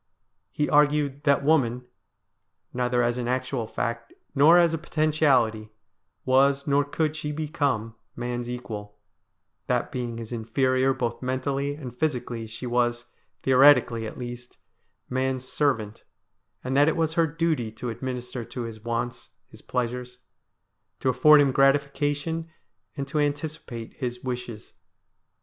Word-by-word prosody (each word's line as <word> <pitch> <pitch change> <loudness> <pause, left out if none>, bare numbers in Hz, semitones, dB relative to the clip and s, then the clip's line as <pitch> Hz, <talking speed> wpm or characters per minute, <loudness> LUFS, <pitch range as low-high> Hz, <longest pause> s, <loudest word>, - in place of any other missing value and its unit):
He 150 - 0
argued 145 -1 +2
that 140 -1 +3
woman, 125 -5 +2 0.9
neither 125 0 +1
as 120 +1 0
an 120 - -3
actual 125 -2 -2
fact, 115 +1 -3 0.2
nor 155 +5 +7
as 170 -2 +4
a 165 - -1
potentiality, 145 -9 +1 0.6
was, 135 +2 +3
nor 145 0 +3
could 155 +2 -1
she 150 -1 -4
become, 145 -7 -1 0.2
man's 120 0 -4
equal; 105 -4 -7 0.7
that - - 0
being 120 -2 -4
his 115 0 -7
inferior 130 +3 +1
both 120 -1 -3
mentally 135 +2 -1
and 130 -5 -8
physically, 125 -5 -2
she 115 +3 -8
was, 120 0 0 0.4
theoretically 125 -4 +5
at - - -9
least, 120 -1 -8 0.5
man's 130 0 -2
servant, 115 -9 -1 0.6
and 130 +1 -2
that 145 +1 +5
it 160 - +1
was 160 -1 +1
her 165 0 +3
duty 155 -7 -1
to 120 +1 -5
administer 125 0 -5
to 120 +2 -6
his 110 -2 -8
wants, 120 +1 -3 0.2
his - - -15
pleasures; 125 0 -3 0.8
to 130 - +1
afford 150 +4 +6
him 140 -2 +3
gratification 145 +4 +1 0.5
and 140 -1 -3
to 150 +2 -1
anticipate 145 -5 -3
his 125 -2 -4
wishes. 125 -4 -6
130 Hz, 135 wpm, -26 LUFS, 120-145 Hz, 0.9 s, nor